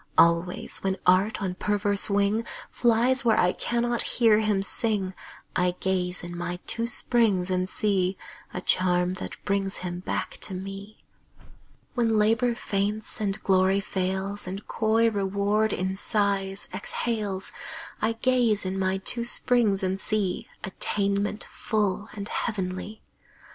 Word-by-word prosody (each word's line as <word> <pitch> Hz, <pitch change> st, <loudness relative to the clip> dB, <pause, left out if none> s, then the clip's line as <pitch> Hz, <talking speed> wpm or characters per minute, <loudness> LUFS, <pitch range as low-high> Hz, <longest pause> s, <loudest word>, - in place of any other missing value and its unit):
Always, 170 Hz, +2 st, +3 dB
when 190 Hz, 0 st, -1 dB
Art 190 Hz, +4 st, +3 dB
on 185 Hz, -2 st, -1 dB
perverse 205 Hz, +2 st, +2 dB
wing 205 Hz, +2 st, +2 dB, 0.3 s
Flies 240 Hz, +2 st, +3 dB
where 225 Hz, -3 st, +3 dB
I 180 Hz, -, +3 dB
cannot 240 Hz, 0 st, 0 dB
hear 225 Hz, -3 st, +4 dB
him 210 Hz, -3 st, +1 dB
sing, 200 Hz, -3 st, +1 dB, 0.4 s
I 180 Hz, 0 st, +1 dB
gaze 180 Hz, -1 st, 0 dB
in 175 Hz, 0 st, -7 dB
my 175 Hz, 0 st, -3 dB
two 230 Hz, 0 st, 0 dB
springs 215 Hz, -7 st, +1 dB
and 185 Hz, 0 st, 0 dB
see 190 Hz, -3 st, +1 dB, 0.3 s
A 180 Hz, -, -5 dB
charm 180 Hz, -1 st, +2 dB
that -, -, -6 dB
brings 195 Hz, -1 st, 0 dB
him 175 Hz, 0 st, -4 dB
back 180 Hz, -, -3 dB
to 190 Hz, -, -1 dB
me. 195 Hz, +3 st, -8 dB, 0.9 s
When 230 Hz, -3 st, +2 dB
Labor 225 Hz, +3 st, +2 dB
faints, 210 Hz, +2 st, -2 dB
and 200 Hz, 0 st, -1 dB
Glory 190 Hz, 0 st, +3 dB
fails, 190 Hz, +1 st, -2 dB
And 195 Hz, +3 st, -5 dB
coy 225 Hz, +1 st, +2 dB
Reward 200 Hz, +2 st, +1 dB
in 190 Hz, +1 st, -1 dB
sighs 200 Hz, -1 st, 0 dB
exhales, 210 Hz, -5 st, -2 dB, 0.5 s
I 220 Hz, +1 st, +1 dB
gaze 230 Hz, -4 st, +2 dB
in 190 Hz, +1 st, -2 dB
my 190 Hz, 0 st, +1 dB
two 235 Hz, +5 st, +1 dB
springs 235 Hz, -4 st, +2 dB
and 190 Hz, +1 st, -1 dB
see 205 Hz, -3 st, 0 dB, 0.2 s
Attainment 200 Hz, +2 st, -1 dB
full 210 Hz, -1 st, -2 dB
and 205 Hz, -1 st, -5 dB
heavenly. 205 Hz, -1 st, -4 dB
200 Hz, 135 wpm, -26 LUFS, 190-220 Hz, 0.9 s, hear